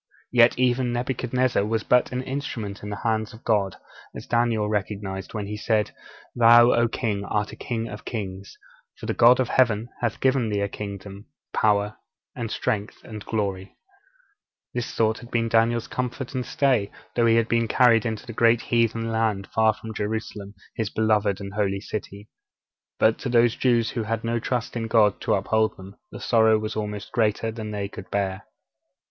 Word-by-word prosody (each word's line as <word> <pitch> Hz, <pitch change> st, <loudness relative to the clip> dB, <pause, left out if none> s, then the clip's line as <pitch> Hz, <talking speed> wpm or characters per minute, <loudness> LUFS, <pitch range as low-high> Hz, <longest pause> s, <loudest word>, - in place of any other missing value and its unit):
Yet 120 Hz, -1 st, +5 dB
even 125 Hz, 0 st, +2 dB
Nebuchadnezzar 125 Hz, -1 st, 0 dB
was 110 Hz, +1 st, -1 dB
but 125 Hz, 0 st, +3 dB
an 125 Hz, 0 st, -2 dB
instrument 130 Hz, -7 st, -5 dB
in 105 Hz, -, -6 dB
the 105 Hz, -, -6 dB
hands 110 Hz, -1 st, -1 dB
of 110 Hz, -, -16 dB
God, 100 Hz, -4 st, +1 dB, 0.4 s
as -, -, -7 dB
Daniel 115 Hz, -3 st, +1 dB
recognized 100 Hz, -1 st, -3 dB
when 105 Hz, -2 st, -3 dB
he 105 Hz, +1 st, -5 dB
said: 105 Hz, -1 st, 0 dB, 0.4 s
'Thou, 120 Hz, +1 st, +7 dB
O 120 Hz, 0 st, +3 dB
king, 110 Hz, -4 st, -2 dB
art 105 Hz, 0 st, -1 dB
a -, -, -9 dB
king 115 Hz, -2 st, -4 dB
of 105 Hz, -2 st, -8 dB
kings: 100 Hz, -4 st, -6 dB, 0.4 s
for -, -, -9 dB
the -, -, -1 dB
God 120 Hz, +2 st, +6 dB
of 130 Hz, -, +1 dB
Heaven 115 Hz, -3 st, +2 dB
hath 120 Hz, -3 st, -2 dB
given 130 Hz, -4 st, +2 dB
thee 100 Hz, -1 st, -1 dB
a 100 Hz, -, +1 dB
kingdom, 100 Hz, 0 st, -8 dB, 0.3 s
power, 105 Hz, -1 st, +1 dB, 0.4 s
and 115 Hz, -3 st, -4 dB
strength, 105 Hz, 0 st, -3 dB
and 110 Hz, -2 st, -8 dB
glory.' 100 Hz, -4 st, -1 dB
(Daniel 95 Hz, -, -14 dB, 1.1 s
ii. -, -, +1 dB
37.) -, -, -5 dB
This -, -, -9 dB
thought 110 Hz, 0 st, +1 dB
had 120 Hz, -, -12 dB
been 115 Hz, -1 st, 0 dB
Daniel's 115 Hz, 0 st, +2 dB
comfort 125 Hz, +1 st, -4 dB
and 130 Hz, -2 st, -3 dB
stay, 125 Hz, -8 st, +1 dB, 0.3 s
though 120 Hz, -1 st, +3 dB
he 115 Hz, -, +5 dB
had 115 Hz, -1 st, +2 dB
been 115 Hz, 0 st, +1 dB
carried 115 Hz, 0 st, +4 dB
into 110 Hz, -1 st, -4 dB
the 120 Hz, -, -7 dB
great 115 Hz, +1 st, +4 dB
heathen 115 Hz, -1 st, 0 dB
land 110 Hz, -3 st, 0 dB
far 110 Hz, 0 st, +4 dB
from 110 Hz, +1 st, -9 dB
Jerusalem, 105 Hz, -1 st, -4 dB, 0.2 s
his 110 Hz, -2 st, -2 dB
beloved 105 Hz, -3 st, +1 dB
and 100 Hz, 0 st, -7 dB
holy 100 Hz, -2 st, 0 dB
city. 105 Hz, 0 st, -7 dB, 0.7 s
But 110 Hz, 0 st, +3 dB
to 135 Hz, -, -4 dB
those 120 Hz, 0 st, +4 dB
Jews 120 Hz, -3 st, +2 dB
who 120 Hz, -, -2 dB
had 115 Hz, +1 st, -3 dB
no 115 Hz, 0 st, 0 dB
trust 120 Hz, +1 st, -3 dB
in 115 Hz, -1 st, -2 dB
God 110 Hz, -3 st, +3 dB
to -, -, +2 dB
uphold 110 Hz, +3 st, +1 dB
them, 95 Hz, +1 st, -11 dB, 0.2 s
the -, -, -8 dB
sorrow 110 Hz, -2 st, +4 dB
was 110 Hz, 0 st, -4 dB
almost 105 Hz, 0 st, -4 dB
greater 110 Hz, -1 st, +1 dB
than 110 Hz, -1 st, -6 dB
they 100 Hz, -1 st, -3 dB
could 100 Hz, -1 st, -10 dB
bear. 95 Hz, -2 st, -2 dB
110 Hz, 190 wpm, -24 LUFS, 105-120 Hz, 1.1 s, Thou